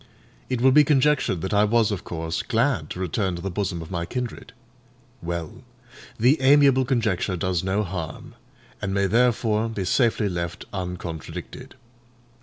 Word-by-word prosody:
It 125 Hz, -2 st, -1 dB
will 130 Hz, +1 st, +6 dB
be 150 Hz, +3 st, +7 dB
conjectured 140 Hz, -, +2 dB
that 95 Hz, -, -3 dB
I 105 Hz, 0 st, +4 dB
was 110 Hz, 0 st, +2 dB
of 100 Hz, -, -3 dB
course 80 Hz, -1 st, -3 dB
glad 115 Hz, -, 0 dB
to -, -, -6 dB
return 95 Hz, +1 st, -1 dB
to 85 Hz, -, -7 dB
the 95 Hz, -, -3 dB
bosom 90 Hz, -3 st, -2 dB
of 80 Hz, -, -12 dB
my 85 Hz, -2 st, -2 dB
kindred. 125 Hz, +3 st, -5 dB, 0.7 s
Well! 85 Hz, -2 st, -5 dB, 0.6 s
the 130 Hz, +7 st, +4 dB
amiable 135 Hz, -1 st, +5 dB
conjecture 110 Hz, -7 st, 0 dB
does 90 Hz, 0 st, -1 dB
no 95 Hz, +3 st, 0 dB
harm, 85 Hz, -5 st, -6 dB, 0.5 s
and 100 Hz, 0 st, -2 dB
may 100 Hz, 0 st, +2 dB
therefore 115 Hz, 0 st, +2 dB
be 100 Hz, -4 st, -3 dB
safely 115 Hz, +1 st, +2 dB
left 85 Hz, -2 st, -4 dB
uncontradicted. 90 Hz, -4 st, -6 dB
100 Hz, 155 wpm, -24 LUFS, 90-120 Hz, 0.7 s, be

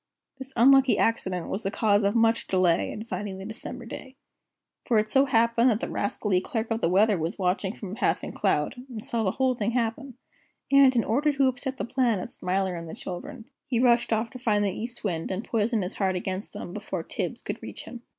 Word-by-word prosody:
This 265 Hz, 0 st, -8 dB
unlucky 270 Hz, +1 st, +6 dB
accident 185 Hz, -6 st, 0 dB
was 195 Hz, -, -3 dB
the 195 Hz, -, -1 dB
cause 205 Hz, 0 st, +2 dB
of 200 Hz, +2 st, +1 dB
much 230 Hz, 0 st, +3 dB
delay 180 Hz, -3 st, +2 dB
in 215 Hz, -, -6 dB
finding 195 Hz, -2 st, -4 dB
the 190 Hz, -, -8 dB
December 235 Hz, +3 st, -7 dB
day. 260 Hz, +3 st, -9 dB, 0.7 s
For 235 Hz, -, +3 dB
it 215 Hz, 0 st, +1 dB
so 270 Hz, +1 st, +5 dB
happened 235 Hz, -1 st, +3 dB
that 220 Hz, -3 st, +1 dB
the -, -, -4 dB
rascally 200 Hz, -2 st, 0 dB
Clerk 225 Hz, +3 st, -3 dB
of 225 Hz, -, 0 dB
the 165 Hz, -, +2 dB
Weather 200 Hz, +1 st, +3 dB
was 160 Hz, +2 st, -3 dB
watching 190 Hz, +1 st, 0 dB
from 195 Hz, -4 st, -7 dB
a -, -, -5 dB
passing -, -, 0 dB
cloud, -, -, 0 dB, 0.2 s
and 220 Hz, -4 st, -7 dB
saw 230 Hz, -1 st, -1 dB
the 190 Hz, -, +2 dB
whole 260 Hz, -1 st, +2 dB
thing 230 Hz, -1 st, -2 dB
happen, 245 Hz, +2 st, -2 dB, 0.6 s
and, 275 Hz, -2 st, +6 dB
in 230 Hz, -, +3 dB
order 285 Hz, +7 st, +2 dB
to 275 Hz, -1 st, +2 dB
upset 260 Hz, +1 st, -3 dB
the -, -, -2 dB
plan 240 Hz, -3 st, +1 dB
of -, -, -6 dB
Smiler 190 Hz, 0 st, -1 dB
and 170 Hz, -1 st, -6 dB
the -, -, -7 dB
children, 235 Hz, +6 st, -7 dB, 0.2 s
he 240 Hz, -3 st, 0 dB
rushed 240 Hz, -1 st, +3 dB
off 220 Hz, +1 st, 0 dB
to 255 Hz, -, -9 dB
find 210 Hz, -4 st, +2 dB
the 200 Hz, -, +1 dB
East 230 Hz, +5 st, -6 dB
Wind 170 Hz, -6 st, -2 dB
and 190 Hz, +3 st, -3 dB
poison 225 Hz, -2 st, 0 dB
his 180 Hz, -, -4 dB
heart 190 Hz, -2 st, 0 dB
against 185 Hz, +2 st, -4 dB
them -, -, -7 dB
before -, -, -4 dB
Tibbs -, -, -4 dB
could -, -, -5 dB
reach -, -, -7 dB
him. 240 Hz, -, -9 dB
225 Hz, 225 wpm, -26 LUFS, 195-245 Hz, 0.7 s, unlucky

